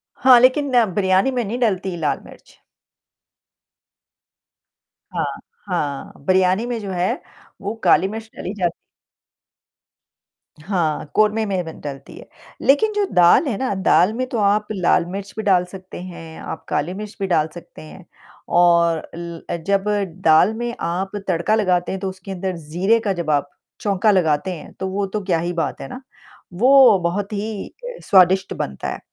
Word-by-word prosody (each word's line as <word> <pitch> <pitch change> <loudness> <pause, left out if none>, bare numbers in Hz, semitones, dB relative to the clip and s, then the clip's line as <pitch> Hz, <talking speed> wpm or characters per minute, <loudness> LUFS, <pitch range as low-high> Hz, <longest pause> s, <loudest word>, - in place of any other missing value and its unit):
हाँ, 255 -2 +6
लेकिन 265 +3 +3 0.2
बिरयानी 190 +5 +2
में 245 -2 -1
नहीं 230 +5 -4
डलती 190 -5 0
लाल 150 -3 -1
मिर्च। - - -17 2.5
हाँ, - - -1 0.4
हाँ। 140 -2 -3
बिरयानी 185 +4 +3
में 240 -2 -3
जो 195 -2 -5
है 180 0 0 0.5
वो 205 +2 -3
काली 190 - +4
मिर्च 220 +2 -7
डाली 190 - -5
जाती 175 -4 -1 1.9
हाँ, 160 -4 -1
कोरमें 215 +1 +3
में 190 -3 -1
ब - - -6
डलती 135 -2 -8
है। - - -12 0.3
लेकिन 360 +11 +3
जो 415 -1 +1
दाल 180 - +5
है 215 -6 -1
ना, 260 -6 -1
दाल 190 +1 +3
में 255 +2 -2
तो 235 - -3
आप 210 0 +2
लाल 180 -3 +2
मिर्च 200 +1 -6
भी 220 - -3
डाल 185 -3 +3
सकते 185 -1 -10
हैं, 165 -3 -9
आप - - -7
काली 160 +5 -1
मिर्च 210 +1 -7
भी 195 - -1
डाल 155 -3 +2
सकते 175 - -12
हैं। 165 +3 -13 0.5
और 170 -2 +4
ल 170 -1 -7
अ, - - -1
जब 195 +3 0 0.4
दाल 165 +7 +5
में 240 +1 -4
आप 185 +4 -2
तड़का 180 +4 +1
लगाते 180 -4 +1
हैं, 190 - -3
तो 190 - -2
उसके 185 +1 -10
अंदर 185 -1 -3
ज़ीरे 175 +9 +1
का 205 -3 -1
जब 170 -3 -4
आप 145 -1 +1 0.3
चोंका 205 +1 +2
लगाते 175 -1 +1
हैं 160 - -10
तो, 190 - -5
वो 195 +1 -1
तो 210 +2 -3
क्या 175 -3 +1
ही 175 +1 -2
बात 170 - -3
है 135 - -6
ना, 255 - -8 0.5
वो 250 0 +6
बहुत 200 +4 -2
ही 210 0 -4 0.2
अ, - - -7
स्वादिष्ट 190 0 +4
बनता 70 0 -4
है। - - -8
190 Hz, 170 wpm, -20 LUFS, 175-215 Hz, 2.5 s, हाँ